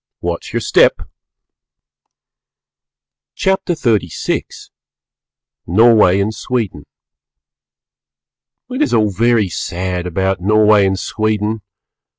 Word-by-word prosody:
Watch -, -, -5 dB
your -, -, -2 dB
Steppe! -, -, +3 dB, 2.3 s
CHAPTER 190 Hz, -3 st, 0 dB
XXXVI 110 Hz, -, -2 dB, 1.0 s
NORWAY 105 Hz, -1 st, +4 dB
AND 105 Hz, +2 st, -1 dB
SWEDEN 110 Hz, -, -4 dB, 1.8 s
It 255 Hz, +4 st, -3 dB
is 300 Hz, -, +1 dB
all 105 Hz, -2 st, +2 dB
very 115 Hz, +1 st, +2 dB
sad 90 Hz, +1 st, -4 dB
about 95 Hz, +1 st, -1 dB
Norway 105 Hz, 0 st, +4 dB
and 95 Hz, 0 st, -1 dB
Sweden! 110 Hz, +1 st, -2 dB
105 Hz, 85 wpm, -16 LUFS, 95-115 Hz, 2.3 s, NORWAY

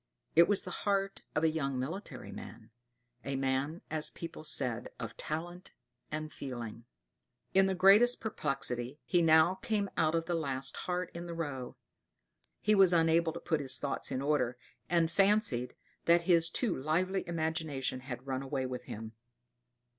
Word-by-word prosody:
It 170 Hz, +1 st, +8 dB
was 205 Hz, -1 st, +2 dB
the -, -, -6 dB
heart 195 Hz, -1 st, 0 dB
of 150 Hz, -, +1 dB
a 160 Hz, -, +4 dB
young 140 Hz, -4 st, -1 dB
military 165 Hz, +11 st, -5 dB
man; -, -, -10 dB, 0.5 s
a 140 Hz, -, -3 dB
man, 135 Hz, +4 st, -1 dB
as 155 Hz, -1 st, -1 dB
people 165 Hz, -2 st, -8 dB
said, 125 Hz, -6 st, -2 dB
of 115 Hz, -2 st, -5 dB
talent 175 Hz, +4 st, -5 dB, 0.4 s
and 155 Hz, 0 st, -4 dB
feeling. 120 Hz, -4 st, -6 dB, 0.7 s
In 195 Hz, 0 st, +5 dB
the 190 Hz, -, 0 dB
greatest 205 Hz, +7 st, +6 dB
perplexity, 135 Hz, -, -3 dB
he 175 Hz, -, +3 dB
now 160 Hz, +2 st, +6 dB
came 205 Hz, -3 st, -1 dB
out 160 Hz, +1 st, +3 dB
of 165 Hz, 0 st, 0 dB
the 175 Hz, -, -2 dB
last 135 Hz, -5 st, -1 dB
heart 180 Hz, -1 st, -3 dB
in 170 Hz, +1 st, -6 dB
the 170 Hz, -, -5 dB
row; 140 Hz, -6 st, -4 dB, 0.9 s
he 215 Hz, -, +3 dB
was 190 Hz, -3 st, +6 dB
unable 165 Hz, 0 st, +4 dB
to 170 Hz, -, -6 dB
put 165 Hz, -2 st, 0 dB
his 135 Hz, -2 st, +3 dB
thoughts 140 Hz, -, -2 dB
in 130 Hz, 0 st, -2 dB
order, 130 Hz, -4 st, +1 dB, 0.3 s
and 170 Hz, -2 st, +2 dB
fancied 195 Hz, -, +2 dB, 0.3 s
that 170 Hz, 0 st, +5 dB
his 170 Hz, -1 st, +4 dB
too 245 Hz, -, 0 dB
lively 180 Hz, +8 st, 0 dB
imagination 160 Hz, -6 st, -2 dB
had 125 Hz, -1 st, -7 dB
run 130 Hz, -1 st, -2 dB
away 135 Hz, -1 st, -2 dB
with 125 Hz, -1 st, -5 dB
him. 110 Hz, +1 st, -7 dB
160 Hz, 160 wpm, -32 LUFS, 135-175 Hz, 0.9 s, It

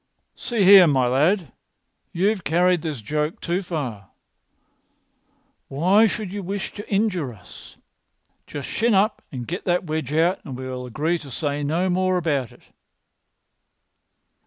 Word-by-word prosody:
"See 230 Hz, -4 st, -1 dB
here, 190 Hz, -2 st, +9 dB
my 135 Hz, -4 st, +2 dB
lad, 150 Hz, -, +1 dB, 0.6 s
you've 195 Hz, +2 st, 0 dB
carried 175 Hz, +2 st, +2 dB
this 150 Hz, -7 st, -4 dB
joke 150 Hz, +6 st, -2 dB
too 175 Hz, +2 st, -1 dB
far. 130 Hz, -, -5 dB, 1.6 s
Why 185 Hz, +10 st, +4 dB
should 200 Hz, -2 st, -4 dB
you 205 Hz, -, -4 dB
wish 195 Hz, +2 st, -4 dB
to 205 Hz, -, -9 dB
injure 195 Hz, -, 0 dB
us? 105 Hz, -6 st, -14 dB, 0.7 s
Just 145 Hz, -2 st, -6 dB
shin 230 Hz, -1 st, +1 dB
up 210 Hz, +3 st, +2 dB
and 125 Hz, -3 st, -6 dB
get 180 Hz, +3 st, -4 dB
that 180 Hz, 0 st, +1 dB
wedge 155 Hz, -4 st, -3 dB
out, 165 Hz, +5 st, +1 dB
and 130 Hz, -4 st, -7 dB
we 130 Hz, 0 st, -6 dB
will 125 Hz, -1 st, -6 dB
agree 155 Hz, +8 st, -1 dB
to 145 Hz, -, -11 dB
say 145 Hz, +1 st, -3 dB
no 165 Hz, +6 st, 0 dB
more 185 Hz, 0 st, +1 dB
about 145 Hz, -8 st, -1 dB
it." -, -, -19 dB
170 Hz, 145 wpm, -23 LUFS, 140-190 Hz, 1.6 s, here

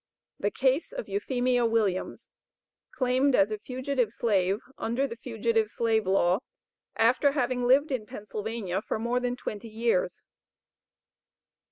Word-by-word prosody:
THE 205 Hz, -, +1 dB
CASE 265 Hz, -, +1 dB
OF -, -, -5 dB
EUPHEMIA 250 Hz, -, +1 dB
WILLIAMS, 215 Hz, -5 st, -1 dB, 0.6 s
CLAIMED 255 Hz, +1 st, +2 dB
AS 195 Hz, +2 st, +3 dB
A 215 Hz, -, -3 dB
FUGITIVE 255 Hz, -1 st, -1 dB
SLAVE 200 Hz, -4 st, +1 dB, 0.2 s
UNDER 235 Hz, +5 st, 0 dB
THE 230 Hz, -, -5 dB
FUGITIVE 225 Hz, -2 st, 0 dB
SLAVE 220 Hz, -3 st, 0 dB
LAW 190 Hz, 0 st, +3 dB, 0.6 s
AFTER 250 Hz, +5 st, +3 dB
HAVING 250 Hz, -3 st, 0 dB
LIVED 280 Hz, +4 st, +4 dB
IN 230 Hz, -5 st, -2 dB
PENNSYLVANIA 210 Hz, -2 st, -4 dB
FOR -, -, -3 dB
MORE 235 Hz, +3 st, 0 dB
THAN 245 Hz, 0 st, -1 dB
TWENTY 225 Hz, -2 st, -6 dB
YEARS. 235 Hz, -, 0 dB
235 Hz, 130 wpm, -28 LUFS, 215-255 Hz, 0.6 s, LIVED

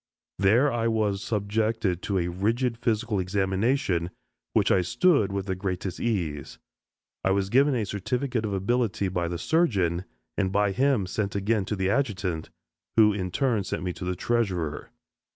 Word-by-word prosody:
There 115 Hz, +9 st, +4 dB
I 115 Hz, -1 st, 0 dB
was 105 Hz, -3 st, 0 dB
subjected 105 Hz, -3 st, -1 dB
to 100 Hz, -, -1 dB
a 85 Hz, -1 st, 0 dB
rigid 115 Hz, +7 st, 0 dB
physical 115 Hz, -3 st, 0 dB
examination, 95 Hz, +1 st, 0 dB, 0.4 s
which -, -, +3 dB
I 95 Hz, -, +4 dB
"stood" 120 Hz, -, +3 dB
with 100 Hz, -1 st, -2 dB
the 95 Hz, -, -1 dB
greatest 95 Hz, 0 st, -4 dB
ease. 85 Hz, -, -2 dB, 0.7 s
I -, -, +2 dB
was 95 Hz, 0 st, +1 dB
given 140 Hz, +2 st, +4 dB
a 115 Hz, -4 st, 0 dB
certificate 120 Hz, +5 st, -2 dB
of 105 Hz, -, -2 dB
ability 100 Hz, 0 st, 0 dB
by 85 Hz, -2 st, -1 dB
the 85 Hz, 0 st, -3 dB
surgeon, 95 Hz, -, +1 dB, 0.3 s
and 95 Hz, -2 st, +1 dB
by 100 Hz, 0 st, +2 dB
him 130 Hz, -1 st, +2 dB
sent 100 Hz, +2 st, -3 dB
again 100 Hz, 0 st, +1 dB
to 105 Hz, -, -2 dB
the 95 Hz, 0 st, 0 dB
adjutant, 100 Hz, -, -1 dB, 0.5 s
who 105 Hz, -2 st, +6 dB
in 95 Hz, -2 st, -3 dB
turn 120 Hz, 0 st, +1 dB
sent 95 Hz, -, -4 dB
me 90 Hz, -1 st, -2 dB
to -, -, -8 dB
the 90 Hz, 0 st, -1 dB
treasurer. 95 Hz, -8 st, -1 dB
100 Hz, 165 wpm, -26 LUFS, 95-115 Hz, 0.7 s, who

